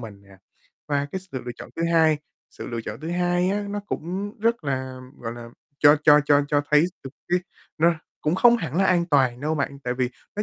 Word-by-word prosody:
mình 105 -4 -10
nè. 100 -1 -18 0.5
Và 145 -1 0
cái 190 - -3
sự 160 -9 -8
lựa 120 - -5
chọn - - -10
thứ 165 - -2
hai, 160 -2 +4 0.3
sự - - -9
lựa 115 -1 -4
chọn 110 +1 -7
thứ 160 +2 -5
hai 175 +1 +1
á, 205 +1 0
nó 205 0 -3
cũng 195 +6 -4
rất 230 -6 +1
là, 130 -1 -3 0.2
gọi 115 -1 -5
là, 120 0 -9 0.3
cho 145 +1 +7
cho 150 -1 +7
cho 145 -1 +4
cho 145 0 +3
thấy 150 +2 +6 0.2
được 135 - -6 0.2
cái 180 - +3 0.4
nó 170 +2 +4 0.3
cũng 155 +3 0
không 240 +5 +6
hẳn 165 - -4
là 195 - +4
an 175 -2 +3
toàn 130 -6 +2
đâu 155 +2 -1
bạn, 140 -1 -2
tại 125 - -1
vì 125 -1 -1 0.3
nó 210 - 0
150 Hz, 230 wpm, -24 LUFS, 130-175 Hz, 0.5 s, cho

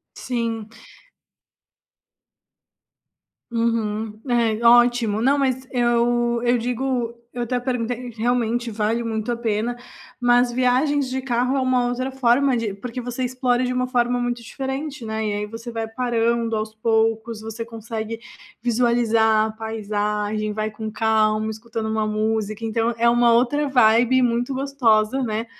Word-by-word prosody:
Sim. 230 -3 -3 2.8
Uhum. 220 -2 -1
É, 235 -2 +1
ótimo, 240 -2 +5
não 270 +5 +3
mas 260 -1 0
eu 240 -1 +2
eu 245 +1 +3
digo 245 0 -1 0.2
eu 245 - -3
até 245 +1 -1
perguntei 245 -1 -3
que 225 -1 -13
realmente, 240 0 0
vale 220 +2 -1
muito 220 0 -2
a 235 - 0
pena, 230 +1 -1 0.4
mas 245 0 +4
viagens 255 +3 +2
de 260 +1 -2
carro 255 +1 0
é - - +1
uma 255 -1 +2
outra 255 +2 -2
forma 265 +1 +3
de 215 -4 -2
porque 240 +4 -6
você 245 +1 -3
explora 250 0 0
de 250 - -1
uma 250 0 -1
forma 245 -1 +1
muito 245 0 -2
diferente, 270 +3 -5
né, 220 0 -3
e, 210 - -1
aí, 205 0 -2
você 225 +3 -8
vai 225 -1 -3
parando 235 -1 0
aos 215 0 -3
poucos, 225 0 0
você 225 +1 -6
consegue 225 0 -6 0.4
visualizar 230 -2 +3
a - - -4
paisagem, 215 -1 -2
vai 215 +1 -2
com 220 +1 -6
calma, 220 0 +1
escutando 220 0 -5
uma 220 -1 0
música, 215 0 -1
então 225 +1 0
é 235 +1 +3
uma 240 0 +4
outra 270 +5 +2
vibe 245 0 +4
muito 245 +2 0
gostosa, 265 -3 +2
né, 220 0 -2
235 Hz, 145 wpm, -22 LUFS, 220-245 Hz, 2.8 s, ótimo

